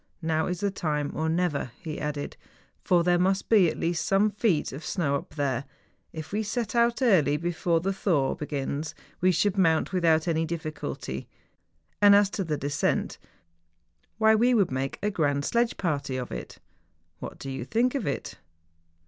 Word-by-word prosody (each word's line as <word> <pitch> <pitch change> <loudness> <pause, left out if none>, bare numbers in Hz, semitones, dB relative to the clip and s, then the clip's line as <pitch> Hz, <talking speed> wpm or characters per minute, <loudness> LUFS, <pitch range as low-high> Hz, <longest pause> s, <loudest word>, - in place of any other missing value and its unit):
Now 160 -1 +1
is 180 -1 -3
the 200 -1 +1
time 150 -6 -2
or 160 +1 -1
never,' 165 -5 0
he 160 -4 -6
added; 150 -1 -4 0.5
'for 175 -2 +3
there 175 0 +3
must 190 +2 +1
be 200 -7 +6
at - - -5
least 170 0 -1
some 200 +2 +3
feet 205 -7 +1
of 140 +4 -8
snow 155 -6 -1
up 140 - -6
there; 140 -3 -1 0.5
if 160 -1 -8
we 210 +2 0
set 225 +2 -3
out 235 +2 +2
early 155 - +4
before 170 0 0
the 195 +3 -1
thaw 165 -9 +1
begins 145 +1 -4 0.3
we 185 +1 +4
should 195 +3 +1
mount 165 -1 +2
without 165 -2 +3
any 165 -1 +1
difficulty: 160 -1 -5 0.7
and 205 -1 +8
as 200 -1 +4
to 195 - -2
the 155 -4 -2
descent, 145 +1 -1 1.0
why 220 0 +5
we 240 +3 +4
would 200 - +2
make 130 +1 -2
a 210 - +1
grand 145 -5 0
sledge 235 0 +1
party 145 -7 -2
of 125 -1 -5
it. - - -7 0.6
What - - -7
do 135 - -6
you 130 - -4
think 230 - +1
of 275 -6 -2
it 140 -7 -4
165 Hz, 175 wpm, -27 LUFS, 150-200 Hz, 1.0 s, and